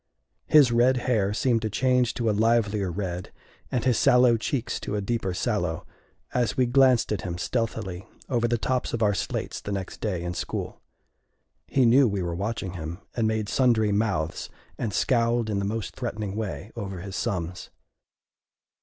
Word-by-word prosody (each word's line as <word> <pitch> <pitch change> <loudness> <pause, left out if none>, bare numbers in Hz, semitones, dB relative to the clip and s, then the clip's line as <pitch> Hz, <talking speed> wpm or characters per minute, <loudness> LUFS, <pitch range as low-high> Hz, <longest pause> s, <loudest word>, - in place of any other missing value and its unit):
His 145 -5 +6
red 125 +2 +4
hair 105 -6 +2
seemed 115 +2 +1
to 110 - -1
change 125 +2 +2
to 120 - -1
a - - +4
livelier 105 -2 +2
red, 90 -1 -4 0.4
and 125 - -1
his 125 -4 +3
sallow 125 -1 +5
cheeks 120 +2 -2
to 105 - -4
a - - 0
deeper 100 -2 -1
sallow, 90 - -1 0.5
as 125 -2 0
we 130 - +4
glanced 130 -2 +4
at 105 - -1
him 85 -2 -4
stealthily 105 -3 -3 0.2
over 120 -3 +1
the 120 0 +1
tops 125 +3 -1
of 115 - -1
our 105 -1 +3
slates 95 - -3
the 100 - -5
next 95 -2 -5
day 90 -5 -2
in 90 0 -3
school. - - -4 0.9
He 130 -2 +3
knew 125 +3 +6
we 100 -3 -1
were 85 -1 -2
watching 100 0 -3
him, 85 -1 -5 0.2
and 115 -2 +1
made 110 -1 -1
sundry 115 -4 +3
mouths 100 -7 -1 0.3
and 115 - -3
scowled 115 0 +1
in 100 - 0
the 100 - -1
most 110 0 -3
threatening 105 -5 -4
way 105 0 -4
over 95 -3 -5
his 100 +1 -7
sums. 90 -2 -3
110 Hz, 175 wpm, -26 LUFS, 95-120 Hz, 0.9 s, His